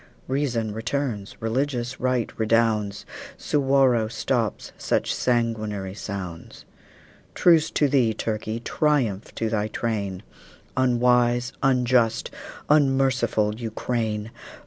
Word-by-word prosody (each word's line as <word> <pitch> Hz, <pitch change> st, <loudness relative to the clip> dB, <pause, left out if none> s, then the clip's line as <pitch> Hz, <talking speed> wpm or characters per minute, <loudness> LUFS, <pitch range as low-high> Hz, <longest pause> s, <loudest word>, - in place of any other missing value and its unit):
Reason 125 Hz, -6 st, -1 dB
returns, 115 Hz, -2 st, -3 dB
religious 125 Hz, +2 st, -2 dB
right 125 Hz, -2 st, 0 dB
redounds, 110 Hz, -2 st, +1 dB, 0.3 s
Suwarrow 135 Hz, -5 st, +2 dB
stops 115 Hz, -1 st, -2 dB
such -, -, 0 dB
sanguinary 110 Hz, -5 st, -1 dB
sounds. 95 Hz, -5 st, -7 dB, 0.7 s
Truce 165 Hz, -2 st, +4 dB
to 145 Hz, -, +2 dB
thee, 130 Hz, -5 st, +3 dB
Turkey! 110 Hz, +1 st, -3 dB
Triumph 120 Hz, -8 st, 0 dB
to 115 Hz, -, -1 dB
thy 110 Hz, -1 st, 0 dB
train, 100 Hz, -5 st, -3 dB, 0.5 s
Unwise, 125 Hz, -1 st, +2 dB
unjust, 125 Hz, -4 st, +2 dB, 0.4 s
unmerciful 135 Hz, -7 st, +2 dB
Ukraine! 110 Hz, -1 st, -3 dB
115 Hz, 90 wpm, -24 LUFS, 110-130 Hz, 0.7 s, Truce